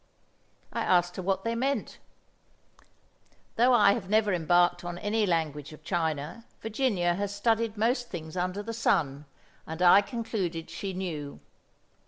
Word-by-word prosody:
I - - -1
asked 175 0 +2
her - - -2
what 190 +1 -1
they 230 - -1
meant; 255 -1 -2 1.6
though 245 +3 +4
I 205 -5 +6
have 195 -5 -5
never 210 -1 +3
embarked 175 +1 +3
on 175 0 -5
any 210 +2 0
language 155 -4 -1
of 155 - -14
China, 160 +3 -2 0.2
Virginia 215 -6 0
has 200 +2 -3
studied 225 +1 +1
most 240 +3 0
things 160 -2 -7
under 185 +3 -2
the 230 +2 -5
sun, 150 -10 0 0.4
and 160 +1 -6
I 180 +2 +7
concluded 200 -7 -4
she 195 -1 -4
knew. 160 -6 -5
190 Hz, 145 wpm, -28 LUFS, 170-220 Hz, 1.6 s, I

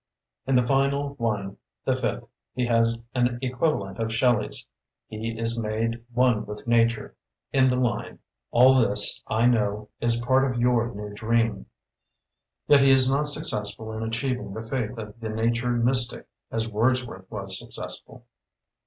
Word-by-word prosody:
In 135 - +2
the 125 - +5
final 140 +2 +1
one, 105 -4 -2 0.3
the - - +2
fifth, - - -3 0.3
he 125 0 0
has 115 -1 +2 0.2
an 120 -1 +1
equivalent 125 -6 -1
of 115 0 -1
Shelley's, 115 -1 +1 0.4
"He 110 +1 -5
is 115 +1 0
made 115 +1 -2
one 125 -2 +2
with 105 0 -8
Nature", 115 -1 +1 0.4
in 130 -1 +4
the 125 - +1
line, 125 -2 -1 0.3
"All 130 +2 +6
this, 130 -3 +2
I 115 +2 +1
know, 105 -3 +1
is 115 0 +1
part 130 +2 +2
of 120 - -3
your 120 -1 +2
new 105 0 -7
dream". 115 -1 0 1.0
Yet 145 -1 +6
he 135 - +5
is 130 -1 +5
not 145 +2 +1
successful 110 -7 0
in 110 - -5
achieving 115 -1 -3
the 110 0 -6
faith 125 -2 -3
of 105 0 -8
the 110 -1 -5
nature 115 +2 0
mystic, 120 +1 +1 0.2
as 115 0 -2
Wordsworth 115 -3 -1
was 95 -3 -3
successful. - - -7
115 Hz, 155 wpm, -25 LUFS, 110-125 Hz, 1.0 s, All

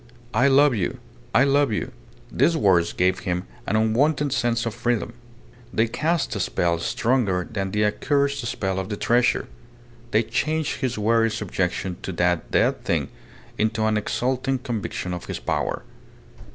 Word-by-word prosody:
"I 125 +6 +4
love 140 0 +5
you! 105 +2 -2 0.3
I 130 - +5
love 140 -2 +3
you!" 110 +4 -2 0.4
These 165 +7 +2
words 90 - +3
gave 90 +1 +1
him 90 0 -2 0.2
an 110 - 0
unwonted 135 +6 +2
sense 120 -1 0
of 115 - -2
freedom; 115 -1 -1 0.6
they 110 +1 +2
cast 160 +8 -1
a - - -2
spell 85 -1 0
stronger 100 -2 0
than 100 -5 -3
the 105 +2 +1
accursed 140 +6 0
spell 95 -4 -2
of 95 +1 -4
the 105 - -3
treasure; 120 +3 +2 0.6
they 110 0 +3
changed 155 +7 -1
his 125 -3 -1
weary 115 +2 +3
subjection 95 -3 -2
to - - -4
that 90 -1 0
dead - - +1
thing - - 0 0.5
into 110 0 +1
an 110 0 +2
exulting 130 +5 0
conviction 115 -7 -4
of 90 - -6
his - - -4
power. - - -2
115 Hz, 155 wpm, -24 LUFS, 95-130 Hz, 0.6 s, love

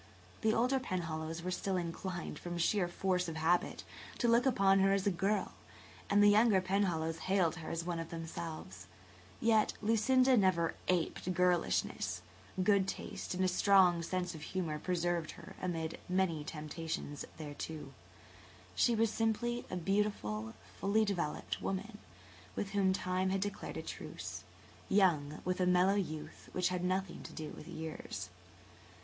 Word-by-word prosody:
The 220 -2 +3
older 255 +3 +3
Penhallows 165 -6 -3
were 185 - -2
still 190 +1 -1
inclined, 175 +1 -4
from 175 0 -5
sheer 180 +2 +2
force 180 0 0
of 165 - -4
habit, 165 +3 +1 0.3
to 240 - +1
look 235 +3 +4
upon 195 -6 +4
her 195 0 +4
as 195 -1 +1
a 200 - +3
girl, 195 +4 0 0.6
and 205 +1 +5
the - - +8
younger 210 -1 +5
Penhallows 180 -4 0
hailed 185 -3 +1
her 160 - -6
as 165 0 -2
one 175 -1 -2
of 165 0 -5
themselves. 160 - -6 0.5
Yet 220 -2 +3
Lucinda 255 +4 +4
never 185 -6 +3
aped 180 0 0
girlishness; 95 - +1 0.4
good 195 -1 +4
taste 185 - -4
and 185 - +1
a - - +4
strong 185 -2 +5
sense 180 +1 -2
of 160 - -9
humour 160 -2 -3
preserved 175 -2 -1
her - - -12
amid 165 -3 -2
many 180 -4 +1
temptations 150 -1 -5
thereto. 150 -2 -6 0.8
She 235 - +3
was 225 0 +2
simply 235 +2 0
a - - -3
beautiful, 165 - -1 0.2
fully 215 +2 +3
developed 175 -7 -2
woman, 210 +3 -3 0.6
with 195 - -3
whom 195 -2 +3
Time 185 0 0
had 195 0 0
declared 205 +1 -4
a - - -4
truce, - - -6 0.5
young 155 -7 +3
with 185 +1 0
a 180 - +3
mellow 180 +2 +5
youth 155 -6 -4
which 180 0 +1
had 180 -1 -2
nothing 185 0 -1
to - - -9
do 155 -1 -6
with - - -10
years. 155 -12 -6
180 Hz, 155 wpm, -34 LUFS, 165-200 Hz, 0.8 s, the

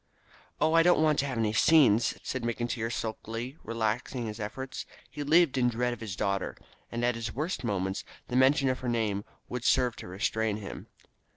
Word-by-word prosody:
"Oh, 160 - +3
I 165 - +7
don't 170 -2 +4
want 155 -2 +3
to 140 - +1
have 130 -3 -3
any 110 -2 +1
scenes," 120 -5 +5
said 130 - -3
McIntyre 120 0 -2
sulkily, 115 +4 -4
relaxing 115 +2 -2
his 110 0 -5
efforts. 130 +5 -5 0.2
He 150 - -6
lived 150 -1 +4
in 125 -1 +4
dread 120 +1 0
of 120 - -8
his 105 -5 -5
daughter, 100 -1 -1 0.3
and 120 +1 -1
at 125 - +2
his 115 -1 -5
worst 150 -2 -2
moments 95 -4 -1 0.2
the 125 - -4
mention 135 +2 +4
of 130 0 0
her 125 - -3
name 105 -4 0 0.2
would 125 -1 -4
serve 125 -3 +3
to - - -8
restrain 105 +3 -1
him. 105 -2 -8
120 Hz, 190 wpm, -29 LUFS, 110-130 Hz, 0.3 s, I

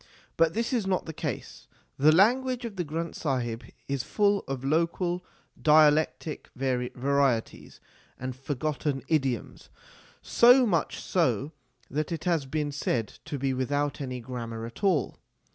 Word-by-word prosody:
But 165 -1 +3
this 230 +3 -1
is 225 -6 0
not 185 -1 0
the 160 - -6
case. - - -5 0.3
The 150 +3 +6
language 245 - +3
of 225 -4 -6
the 180 - -1
Granth 165 +2 -4
Sahib 120 -6 -2 0.2
is 140 -2 -1
full 205 - +1
of 135 -1 -4
local 170 +4 0 0.4
dialectic 155 0 +3
varieties 130 -1 -1 0.4
and 130 0 -5
forgotten 140 +1 -2
idioms, 135 -7 -1 0.5
so 250 +2 +6
much 175 -8 0
so 145 - 0 0.4
that 150 +4 -2
it 165 -2 -3
has 165 -6 0
been 150 +1 -2
said 120 -6 -1 0.2
to 145 - -4
be 135 0 0
without 145 +3 -1
any 130 -2 -4
grammar 115 -2 -5
at 115 - -11
all. 180 -9 +1
150 Hz, 140 wpm, -28 LUFS, 130-170 Hz, 0.5 s, The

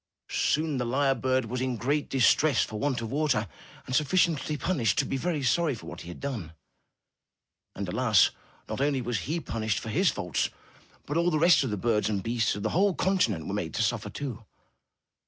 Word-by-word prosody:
Soon 155 -2 +1
the 125 - 0
lyre 135 +3 +2
bird 130 -1 0
was 125 +3 -3
in 130 -2 -1
great 140 +7 -1
distress 135 +1 +4
for 110 - -5
want 135 -2 0
of 115 -1 -5
water, 140 -7 +1 0.4
and 130 - -3
sufficiently 155 0 +2
punished 125 - 0
to - - +2
be - - -2
very 150 +1 -1
sorry 150 +2 +2
for 110 - -12
what 85 - -8
he - - -11
had 85 - -8
done. 115 - -5 1.2
And - - -4
alas! - - +4 0.4
not - - -4
only 140 -1 +2
was 120 -3 -1
he 165 +2 0
pun 115 -8 -5
ished 110 -3 0
for 110 - -5
his 180 - +3
fault, 90 -4 -1 0.6
but 145 - -2
all 170 +1 +3
the 155 - +1
rest 170 0 +5
of 130 - -2
the 105 - -2
birds 105 +1 +1
and 100 -3 -1
beasts 115 -3 0
on 100 - -5
the 110 - 0
whole 195 +1 +2
continent 120 - +1
were 95 - -4
made 90 -6 -3
to 110 - +1
suffer, 105 -1 -1
too. 120 0 -6
130 Hz, 210 wpm, -28 LUFS, 110-150 Hz, 1.2 s, rest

